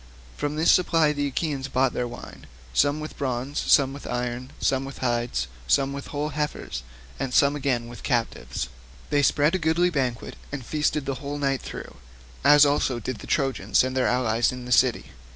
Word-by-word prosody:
From 145 0 -2
this 160 +2 +4
supply 165 -4 +3
the 145 -1 -1
Achaeans 140 -1 -2
bought 130 -1 +1
their 125 - -1
wine, 120 0 -10 0.3
some 145 - +3
with 155 0 -8
bronze, 130 +1 -2
some 135 -2 +4
with 140 - -9
iron, 125 +1 -3
some 135 0 +1
with 135 0 -8
hides, 120 - -1 0.2
some 135 - +2
with 140 0 -6
whole 150 +1 -2
heifers, 150 - -3 0.4
and 135 - -2
some 140 +2 +4
again 130 -5 -1
with 120 0 -10
captives. 115 - -2 0.4
They 145 - +3
spread 145 +3 +3
a 185 - +1
goodly 165 +2 +2
banquet 130 -6 -2
and 140 -4 -5
feasted 150 0 0
the 135 -1 -3
whole 145 0 -4
night 135 -2 0
through, - - -8 0.5
as 145 +1 +8
also 140 -3 +1
did 125 +1 -5
the - - -10
Trojans 135 -3 +2
and 130 0 -2
their 130 - +2
allies 120 -2 +2
in 125 -1 -7
the 125 - -7
city. 115 - +3
135 Hz, 190 wpm, -25 LUFS, 125-145 Hz, 0.5 s, as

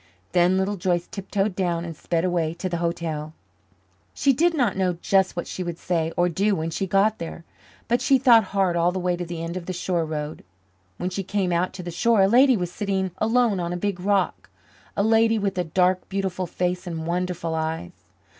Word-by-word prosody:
Then 180 +1 +3
Little 195 +2 0
Joyce 175 -1 0
tiptoed 195 0 -2
down 175 -3 -1
and 165 -1 -6
sped 170 +3 -1
away 170 -3 0
to 185 - -4
the 170 -1 -2
hotel. 165 -2 -3 0.8
She 275 - +3
did 335 +6 +2
not 245 - +1
know 185 -2 +1
just 190 +2 +1
what 175 - -3
she - - -6
would 175 -2 -4
say 165 -2 -1
or 175 - +3
do 195 +4 +1
when 160 0 -3
she 190 +4 -2
got 200 +4 +2
there, 165 0 -7 0.4
but 240 +1 +1
she 270 - +4
thought 235 -4 +6
hard 190 -2 +1
all 170 +1 +3
the 190 - -4
way 180 -1 0
to 175 0 -4
the 165 -1 -5
end 170 +1 -4
of 175 - -7
the 185 - -2
shore 175 -1 -1
road. 150 -1 -5 0.5
When 180 +1 -3
she 195 - -2
came 195 -1 -1
out 175 +2 +1
to 185 -1 -7
the 175 - -5
shore, 225 +3 +3
a - - +5
lady 250 +3 +5
was 180 -2 -3
sitting 190 -2 -1
alone 225 -2 +2
on 175 0 -2
a - - -2
big 195 0 -2
rock 195 0 0 0.5
a 200 - +3
lady 225 +1 +4
with 200 -1 -1
a - - +2
dark, 180 +2 +1
beautiful 190 -2 -2
face 180 +2 -2
and 165 -2 -4
wonderful 175 -1 -2
eyes. 160 - -3
180 Hz, 215 wpm, -24 LUFS, 170-200 Hz, 0.8 s, thought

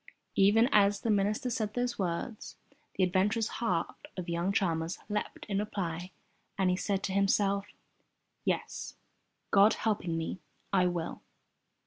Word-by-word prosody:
Even 210 +4 +5
as 200 -1 +4
the 230 - +1
minister 210 +5 +1
said 215 -2 -2
those 245 -1 -1
words, 190 +5 -3 0.4
the 190 - +2
adventurous 200 +5 +2
heart 180 -8 -1
of 180 - -4
young 170 +3 0
Chalmers 170 -5 0
leapt 210 0 -3
in 200 -2 -1
reply 180 -4 -3 0.5
as 190 -1 +2
he 180 - +3
said 195 +1 -1
to 190 - -1
himself, 200 0 +2 0.8
"Yes, - - -2 0.6
God 200 +2 +6
helping 190 -7 -1
me, 165 +3 -3 0.3
I 185 -2 +4
will." 175 -2 -3
195 Hz, 135 wpm, -31 LUFS, 180-210 Hz, 0.8 s, God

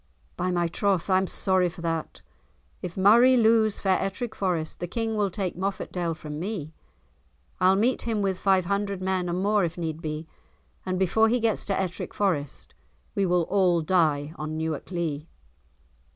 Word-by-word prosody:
"By 180 - -1
my 175 -1 +1
troth, 195 +1 0
I 185 - +5
am 190 - -1
sorry 185 -1 +1
for 170 0 -11
that; 165 -2 -3 0.6
if 175 - -6
Murray 235 +7 +6
lose 220 -2 +3
fair 190 -2 +2
Ettrick 220 +4 -3
Forest, 175 -5 -2
the 175 - -3
King 225 +4 -2
will 205 -2 +1
take 190 -1 -3
Moffatdale 180 -2 -3
from 150 -1 -7
me. 175 -5 -4 0.9
I'll 185 +1 +5
meet 235 +6 +1
him 220 -3 -1
with 190 -2 -1
five 190 -2 +3
hundred 200 +1 -1
men, 185 -1 -1
and 180 +2 -1
more 205 0 +3
if 170 0 -2
need 160 -2 -4
be, 155 0 -4 0.6
and 185 0 0
before 220 +4 +3
he 245 +2 +2
gets 225 -2 0
to 195 - -1
Ettrick 185 -2 -4
Forest, 165 -9 -2 0.4
we 195 -1 +1
will 175 -1 +2
all 180 -2 +2
die 155 -3 +1
on 155 +1 -4
Newark 160 -2 -3
Lee." 165 -4 -3
185 Hz, 175 wpm, -26 LUFS, 165-200 Hz, 0.9 s, Murray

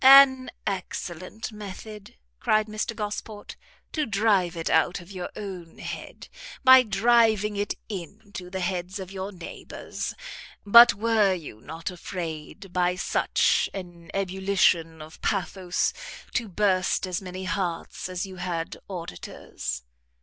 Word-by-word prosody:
"An 265 -1 +9 0.2
excellent 185 +1 -4
method," 210 0 -9 0.2
cried 215 0 +3
Mr 215 +2 -3
Gosport, 210 0 -5 0.4
"to 305 -3 -1
drive 195 -5 +2
it 165 - -3
out 180 - +3
of 175 +2 -13
your 180 -2 -5
own 185 -5 -7
head, - - -7 0.4
by 260 -1 +10
driving 220 -2 +3
it 205 0 -1
into 200 0 -7
the 190 0 -4
heads 180 +1 -2
of 190 -1 -7
your 195 +1 -4
neighbours! 175 -4 -6 0.5
But 235 +4 +9
were 210 -2 +3
you 150 -11 -9
not 165 +6 -5
afraid, 175 +1 -6
by 180 0 +2
such 180 - +2
an 175 -3 -8
ebullition 185 -4 +2
of 155 +1 -13
pathos, 185 -2 0 0.4
to 235 -3 0
burst 190 -1 +2
as 185 0 -2
many 185 0 -6
hearts 180 -1 -3
as 185 +1 -2
you 190 -1 -9
had 175 -2 -3
auditors?" 90 - -6
190 Hz, 130 wpm, -26 LUFS, 175-210 Hz, 0.5 s, by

